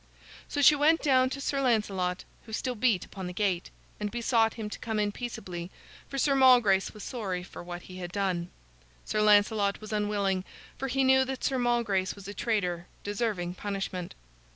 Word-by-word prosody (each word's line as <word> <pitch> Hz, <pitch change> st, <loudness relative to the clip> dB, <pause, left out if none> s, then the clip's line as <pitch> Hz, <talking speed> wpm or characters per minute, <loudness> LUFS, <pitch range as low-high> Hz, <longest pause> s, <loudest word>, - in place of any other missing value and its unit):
So 290 Hz, -, 0 dB
she 300 Hz, -, +9 dB
went 310 Hz, +3 st, +3 dB
down 260 Hz, -3 st, +4 dB
to 270 Hz, -, -5 dB
Sir 275 Hz, 0 st, -1 dB
Lancelot, 195 Hz, -7 st, 0 dB, 0.2 s
who 220 Hz, -, -9 dB
still 250 Hz, +3 st, -1 dB
beat 225 Hz, -5 st, +1 dB
upon 190 Hz, -2 st, -7 dB
the 180 Hz, -, -6 dB
gate, 185 Hz, -3 st, 0 dB, 0.3 s
and 210 Hz, 0 st, -2 dB
besought 230 Hz, -1 st, +1 dB
him 220 Hz, -2 st, -4 dB
to -, -, -6 dB
come 220 Hz, -2 st, -3 dB
in 210 Hz, -1 st, +1 dB
peaceably, 190 Hz, -7 st, -6 dB, 0.4 s
for 275 Hz, -, -5 dB
Sir 275 Hz, +1 st, +3 dB
Malgrace 245 Hz, -8 st, +5 dB
was 210 Hz, -, -10 dB
sorry 190 Hz, -7 st, -3 dB
for -, -, -10 dB
what 175 Hz, 0 st, -7 dB
he 185 Hz, -, -10 dB
had 175 Hz, -1 st, -6 dB
done. 180 Hz, -2 st, -1 dB, 0.6 s
Sir 215 Hz, -, 0 dB
Lancelot 205 Hz, -1 st, +4 dB
was 215 Hz, 0 st, -7 dB
unwilling, 205 Hz, -3 st, 0 dB, 0.3 s
for 270 Hz, -, -3 dB
he 270 Hz, +1 st, +1 dB
knew 265 Hz, 0 st, +5 dB
that 265 Hz, -1 st, -5 dB
Sir 265 Hz, -2 st, +1 dB
Malgrace 230 Hz, -6 st, +1 dB
was 200 Hz, -1 st, -11 dB
a 205 Hz, -, -5 dB
traitor, 180 Hz, -7 st, -1 dB, 0.2 s
deserving 205 Hz, -4 st, -2 dB
punishment. 190 Hz, -2 st, -4 dB
210 Hz, 185 wpm, -29 LUFS, 190-245 Hz, 0.6 s, she